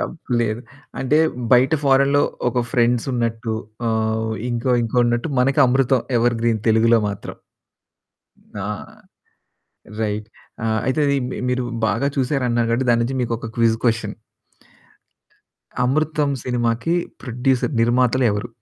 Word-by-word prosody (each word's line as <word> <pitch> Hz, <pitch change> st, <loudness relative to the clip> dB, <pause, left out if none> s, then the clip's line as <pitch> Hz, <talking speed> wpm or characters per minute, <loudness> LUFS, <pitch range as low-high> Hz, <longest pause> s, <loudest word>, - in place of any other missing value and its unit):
తప్పు 160 Hz, -6 st, -7 dB
లేదు. 110 Hz, 0 st, -1 dB, 0.4 s
అంటే 140 Hz, +3 st, +2 dB, 0.3 s
బయట 130 Hz, +5 st, +5 dB
ఫారిన్‌లో 140 Hz, +1 st, +4 dB, 0.3 s
ఒక 125 Hz, 0 st, 0 dB
'ఫ్రెండ్స్' 120 Hz, +1 st, +1 dB
ఉన్నట్టు, 115 Hz, -1 st, -2 dB, 0.3 s
ఆహ్, 110 Hz, -1 st, 0 dB
వో 110 Hz, -, -2 dB, 0.2 s
ఇంకో 120 Hz, +2 st, -1 dB
ఇంకో 115 Hz, +2 st, -3 dB
ఉన్నట్టు 120 Hz, +5 st, 0 dB
మనకు 135 Hz, +3 st, +2 dB
'అమృతం' 130 Hz, 0 st, +2 dB
ఎవర్‌గ్రీన్ 115 Hz, -2 st, +1 dB
తెలుగులో 115 Hz, +1 st, +4 dB
మాత్రం. 100 Hz, -, -7 dB, 1.3 s
ఆ! -, -, -3 dB, 1.3 s
రైట్. 105 Hz, 0 st, -2 dB, 0.4 s
ఆహ్, 110 Hz, 0 st, +1 dB
అయితే 130 Hz, +4 st, 0 dB
అది 140 Hz, -, +2 dB
మీ -, -, -5 dB
మీరు 125 Hz, 0 st, 0 dB, 0.2 s
బాగా 140 Hz, -, 0 dB
చూసారు 135 Hz, +1 st, 0 dB
అన్నారు 120 Hz, -1 st, +1 dB
కాబట్టి, 125 Hz, +2 st, 0 dB
దాన్నుంచి 120 Hz, +3 st, +1 dB
మీకొక 115 Hz, -1 st, -3 dB
క్విజ్ 115 Hz, -1 st, +3 dB
క్వెషన్. 115 Hz, -3 st, 0 dB, 1.7 s
'అమృతం' 150 Hz, +2 st, +1 dB
సినిమాకి 120 Hz, +6 st, 0 dB, 0.3 s
ప్రొడ్యూసర్, 130 Hz, +2 st, 0 dB
నిర్మాతలు 125 Hz, +2 st, +2 dB
ఎవరు? 105 Hz, +4 st, -3 dB
120 Hz, 120 wpm, -21 LUFS, 115-130 Hz, 1.7 s, బయట